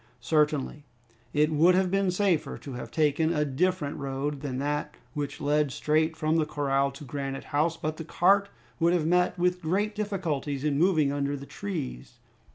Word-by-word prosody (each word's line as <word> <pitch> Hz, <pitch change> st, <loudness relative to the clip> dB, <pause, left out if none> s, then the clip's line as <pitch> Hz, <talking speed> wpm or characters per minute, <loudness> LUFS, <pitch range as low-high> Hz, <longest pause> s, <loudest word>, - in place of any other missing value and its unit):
Certainly, 150 Hz, +2 st, 0 dB, 0.5 s
it 150 Hz, +1 st, +2 dB
would 165 Hz, +4 st, +5 dB
have 185 Hz, -1 st, +2 dB
been 195 Hz, -1 st, +2 dB
safer 180 Hz, -6 st, +1 dB
to 140 Hz, -, -9 dB
have 125 Hz, -, -6 dB
taken 155 Hz, +1 st, +2 dB
a 150 Hz, -3 st, +1 dB
different 150 Hz, +1 st, 0 dB
road 140 Hz, +1 st, -3 dB
than 135 Hz, -4 st, -3 dB
that 150 Hz, +2 st, -2 dB, 0.2 s
which 145 Hz, -2 st, -4 dB
led 145 Hz, 0 st, +1 dB
straight 155 Hz, +4 st, +1 dB
from 155 Hz, +1 st, +1 dB
the 160 Hz, -, +2 dB
corral 140 Hz, -2 st, +1 dB
to 140 Hz, -, -10 dB
Granite 135 Hz, 0 st, -4 dB
House, 155 Hz, +3 st, 0 dB
but 155 Hz, 0 st, -3 dB
the 165 Hz, -, -5 dB
cart 195 Hz, +5 st, +3 dB, 0.3 s
would 170 Hz, +1 st, +3 dB
have 170 Hz, -3 st, +1 dB
met 180 Hz, +2 st, +2 dB
with 180 Hz, 0 st, +1 dB
great 200 Hz, +6 st, 0 dB
difficulties 170 Hz, -10 st, -2 dB
in 145 Hz, -2 st, +1 dB
moving 160 Hz, -5 st, +3 dB
under 145 Hz, 0 st, -1 dB
the 140 Hz, -, -9 dB
trees. 65 Hz, -, -6 dB
150 Hz, 175 wpm, -27 LUFS, 140-175 Hz, 0.5 s, would